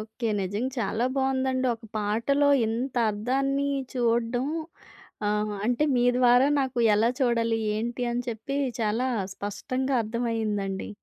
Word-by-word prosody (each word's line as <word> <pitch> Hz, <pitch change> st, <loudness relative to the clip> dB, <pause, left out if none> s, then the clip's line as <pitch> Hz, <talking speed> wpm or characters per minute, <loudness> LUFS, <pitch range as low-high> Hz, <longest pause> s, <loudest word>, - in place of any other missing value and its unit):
Okay. 220 Hz, +2 st, -4 dB
నిజంగా 205 Hz, +7 st, -2 dB
చాలా 225 Hz, +2 st, 0 dB
బావుందండి! 260 Hz, -1 st, +1 dB
ఒక 225 Hz, 0 st, -16 dB
పాటలో 235 Hz, +8 st, +1 dB, 0.2 s
ఇంత 240 Hz, +4 st, -2 dB, 0.2 s
అర్థాన్ని 270 Hz, +6 st, 0 dB, 0.3 s
చూడ్డం 240 Hz, +1 st, +1 dB, 0.8 s
ఆహ్, 210 Hz, 0 st, 0 dB
అంటే 245 Hz, +5 st, +2 dB
మీ 245 Hz, -, +3 dB
ద్వారా 250 Hz, +1 st, +5 dB
నాకు 260 Hz, -2 st, -2 dB, 0.2 s
ఎలా 220 Hz, +2 st, +3 dB
చూడాలి? 230 Hz, -2 st, +2 dB, 0.2 s
ఏంటి? 235 Hz, +3 st, -3 dB
అని 240 Hz, +1 st, -1 dB
చెప్పి 235 Hz, +5 st, -4 dB, 0.2 s
చాలా 225 Hz, +4 st, 0 dB, 0.3 s
స్పష్టంగా 255 Hz, +6 st, -3 dB
అర్థమయిందండి. 215 Hz, -4 st, -2 dB
235 Hz, 120 wpm, -26 LUFS, 220-260 Hz, 0.8 s, ద్వారా